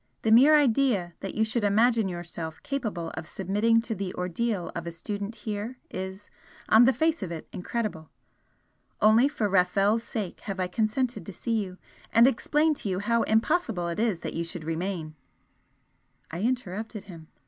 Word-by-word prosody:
The 220 - +2
mere 270 +7 +8
idea 245 - +2
that 195 - -6
you 220 - +2
should 220 +1 -1
imagine 220 +1 +3
yourself, 170 -2 -6
capable 215 -12 -3
of 160 - -7
submitting 210 +4 +2
to 230 0 -4
the 195 -3 -4
ordeal 180 +2 -2
of 170 0 -4
a - - -3
student 205 +5 -5
here 215 +3 -5
is, 190 +2 -6 0.4
on 225 +2 +7
the 260 - +6
face 320 +2 +1
of 185 -3 -4
it, 165 -2 -6
incredible. 185 -5 -4 0.9
Only 220 +5 +6
for 285 -8 -1
Rafel's 195 +3 +3
sake 210 -7 -5
have 195 -2 -6
I 185 - +1
consented 220 +6 -1
to 200 - -8
see 225 +3 -1
you 185 -1 -9 0.3
and 230 +1 +7
explain 295 +5 +2
to 205 - -3
you 185 - -1
how 230 +4 +1
impossible 225 - +1
it 170 - -4
is 215 -7 0
that - - -4
you 165 - -2
should 170 0 -6
remain 165 0 -3 0.6
" - - -30
I 170 +3 -4
interrupted 220 -3 -2
him. 165 -6 -12
210 Hz, 175 wpm, -27 LUFS, 180-230 Hz, 0.9 s, mere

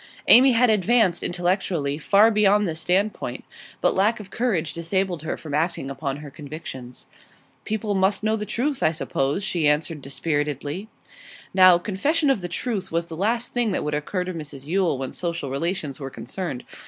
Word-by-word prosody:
Amy 260 +2 +8
had 240 0 +4
advanced, 210 -3 +3
intellectually, 175 -5 -1
far 205 +7 +5
beyond 210 -1 +3
this 160 -1 -4
standpoint, 195 +5 -1 0.4
but - - +3
lack 210 +4 +2
of 200 -2 -11
courage 195 - -1
disabled 175 0 -1
her 155 - -3
from 155 -3 -8
acting 155 -2 -1
upon 135 0 -4
her 145 -1 -10
convictions. 135 -4 -9 0.6
'People 215 -1 -2
must 195 +2 +1
know 220 0 +2
the 210 - -3
truth, 245 +7 -2
I 155 - +3
suppose,' 145 +2 -1
she 170 -6 +1
answered 150 +1 0
dispiritedly. 145 - -3 0.7
Now, 185 -2 +7
confession 280 - +1
of 225 - 0
the 175 - -3
truth 195 0 -3
was 165 +1 0
the 165 - -8
last 230 +7 -1
thing 240 -4 +1
that - - -1
would 150 0 -2
occur 150 +5 -2
to 185 0 -5
Mrs 150 -4 -8
Yule 175 -2 +1
when 130 0 -5
social 170 -6 -3
relations 155 -1 -2
were 135 -2 -5
concerned. 170 -3 -6
175 Hz, 175 wpm, -24 LUFS, 150-210 Hz, 0.7 s, Amy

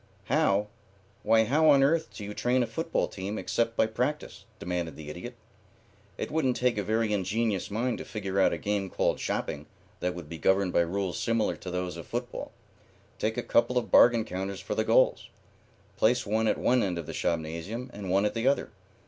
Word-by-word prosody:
"How? 100 +1 +3 0.6
Why, 110 0 +4
how 150 +7 +3
on 140 -2 +6
earth 160 +3 +2
do 105 - -9
you 105 +1 -5
train 125 +3 +1
a - - 0
football 165 +7 -1
team 100 +2 -5
except 115 0 -1
by - - +4
practice?" 125 +7 -3
demanded 85 -3 -3
the 75 -1 -8
Idiot. 120 +10 -8 0.8
"It - - -4
wouldn't 135 -6 +1
take 125 -4 +1
a - - -1
very 110 +1 0
ingenious 100 +1 -1
mind 120 +4 -1
to - - -5
figure 100 -3 -3
out - - +4
a - - -2
game 100 -2 -2
called - - 0
shopping - - -3 0.3
that 90 0 -2
would 90 -3 -8
be 80 +1 -8
governed 95 +3 +2
by - - +4
rules 90 +1 -2
similar 115 -1 +1
to 90 - -8
those 90 -1 -3
of 85 - -9
football. - - -5 0.7
Take 110 +2 -1
a 120 - -1
couple 120 +2 +2
of 120 - -1
bargain 120 -2 +6
counters 95 -1 -4
for - - -4
the - - +1
goals. - - +3 0.7
Place 120 +2 +3
one 110 +2 +1
at - - +2
one 125 0 +3
end 90 -5 -1
of 85 - -4
the - - -7
shopnasium 85 +10 -3
and 100 -2 -6
one 100 +3 +3
at 105 - 0
the 115 +2 -1
other. 140 - +1
105 Hz, 200 wpm, -28 LUFS, 95-120 Hz, 0.8 s, on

